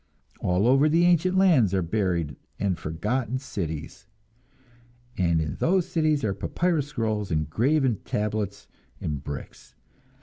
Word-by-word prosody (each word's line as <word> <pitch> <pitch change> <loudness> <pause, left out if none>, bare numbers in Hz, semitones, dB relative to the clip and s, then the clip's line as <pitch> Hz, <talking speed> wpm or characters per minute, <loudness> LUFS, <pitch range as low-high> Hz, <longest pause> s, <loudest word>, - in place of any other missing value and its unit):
All 90 +3 +1
over 135 +4 +5
the 170 +3 +4
ancient 175 +2 +3
lands 145 - +4
are 95 - +1
buried 85 -4 -1 0.2
and 95 -2 +1
forgotten 105 +11 -2
cities, 80 - -6 1.1
and 85 -3 +2
in 80 -2 -3
those 180 0 +2
cities 155 -3 +1
are 100 - +1
papyrus 165 - -1
scrolls 110 -8 -2
and 75 -2 0
graven 130 - +2
tablets 105 -1 -3 0.3
and 75 -3 -4
bricks. 75 -2 -8
105 Hz, 130 wpm, -26 LUFS, -, 1.1 s, over